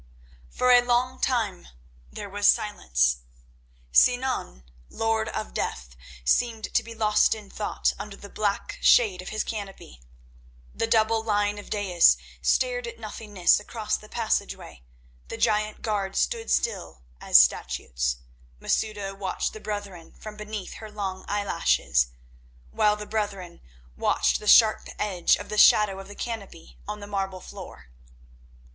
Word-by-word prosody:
For 250 - +2
a 245 0 +7 0.4
time 220 -8 -1 0.4
there 205 - -7
was 205 +1 0
silence. 60 - +2 0.7
Sinan, 245 - +2 0.3
Lord 225 0 -1
of - - -5
Death, 60 0 -4 0.3
seemed 225 - 0
to - - +3
be 230 0 -10
lost 215 0 +3
in 210 -3 -12
thought 210 - -1
under 205 -1 -7
the 200 - -11
black 200 0 -3
shade 200 -7 +4
of 185 - -8
his 215 0 -2
canopy; 195 - -8 0.7
the 225 - -1
double 225 0 +2
line 205 -1 0
of 205 - -11
daïs 190 -5 +4 0.2
stared - - +1
at 470 - -8
nothingness 210 -5 +1
across 215 +1 -3
the 215 - -10
passage 230 -2 -1
way; - - -13 0.5
the - - -6
giant 215 -1 0
guards 200 -3 -2
stood 465 -2 -1
still 190 - -1 0.2
as - - +6
statues; 60 0 +1 0.4
Masouda 205 -3 -2
watched 195 -1 -3
the 215 - -8
brethren 205 -5 -7
from 215 -1 -10
beneath 210 -2 -6
her 220 - -8
long 195 -3 -5
eye 205 0 -1
lashes, 60 - +1 0.6
while 210 - +3
the 210 0 -7
brethren 200 -5 -4 0.3
watched - - +1
the 210 - -9
sharp 215 0 +6
edge 190 -4 +2
of - - -9
the 210 - -1
shadow 205 -3 +6
of 195 - -10
the 205 - -11
canopy 210 -8 -7
on 210 0 -5
the - - -7
marble 195 -2 -3
floor. 65 - -11
205 Hz, 145 wpm, -26 LUFS, 190-220 Hz, 0.7 s, a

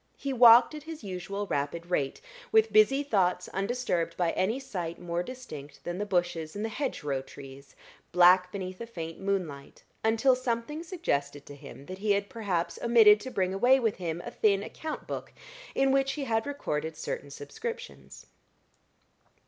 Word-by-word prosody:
He 275 -1 -3
walked 240 +1 +8
at 305 - -7
his 315 -3 -9
usual 195 +1 -4
rapid 155 0 -2
rate, 140 -6 -1 0.3
with 440 0 +4
busy 355 -10 +5
thoughts 185 -8 +1
undisturbed 195 -5 -2
by 175 -2 +1
any 220 +8 0
sight 180 -11 -5
more 175 -1 -2
distinct 175 - -9
than 175 +2 -4
the 205 - -2
bushes 175 -4 -1
and 210 +2 -2
the - - -2
hedgerow 150 - -2
trees, 135 +1 -13 0.4
black 180 +1 +6
beneath 185 0 -6
a 235 - -5
faint 165 -7 -7
moonlight, 180 -8 -3 0.2
until 225 +4 +4
something 255 +4 -3
suggested 145 - -2
to 145 - -10
him 140 -1 -12
that 185 +3 -8
he 205 0 +2
had 200 0 -1
perhaps 190 -7 -2
omitted 225 -3 +7
to 260 - -7
bring 185 -6 -1
away 245 +7 +4
with 225 -4 0
him 170 -1 -4
a - - -6
thin 200 -2 +2
account 310 +8 -6
book - - -6 0.4
in 270 0 +3
which 270 0 +2
he 290 -2 -4
recorded 225 - -2
certain 145 -2 -5
subscriptions. 445 - -8
200 Hz, 165 wpm, -29 LUFS, 170-250 Hz, 0.4 s, walked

